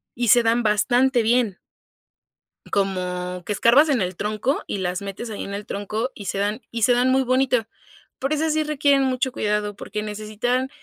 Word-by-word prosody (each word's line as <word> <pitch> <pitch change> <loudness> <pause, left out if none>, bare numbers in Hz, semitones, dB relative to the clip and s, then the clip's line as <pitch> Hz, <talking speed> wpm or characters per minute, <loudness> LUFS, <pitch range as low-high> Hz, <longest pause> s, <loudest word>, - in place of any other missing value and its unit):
y 240 0 -1
se 240 +2 +6
dan 230 +1 +2
bastante 245 +4 +3
bien. 225 -4 +1 1.1
Como 180 -2 -2
que 210 - -2
escarbas 245 +9 +5
en 265 -6 +2
el 180 -1 -3
tronco 215 +6 -1
y 200 - -3
las 180 +1 -2
metes 200 +4 -6
ahí 210 - -5
en 200 - -6
el 200 +1 -5
tronco 215 +6 -3
y 205 - -10
se 195 - -3
dan 205 +4 -1
y 230 - -5
se 235 - +4
dan 245 +1 +2
muy 265 +1 +3
bonito, 255 -2 +2 0.5
pero 275 +3 0
esas 315 +1 0
sí 310 0 +1
requieren 285 -2 +2
mucho 260 0 0
cuidado 210 -3 -1
porque 210 +1 -5
necesitan 215 +5 -2
225 Hz, 190 wpm, -23 LUFS, 205-255 Hz, 1.1 s, se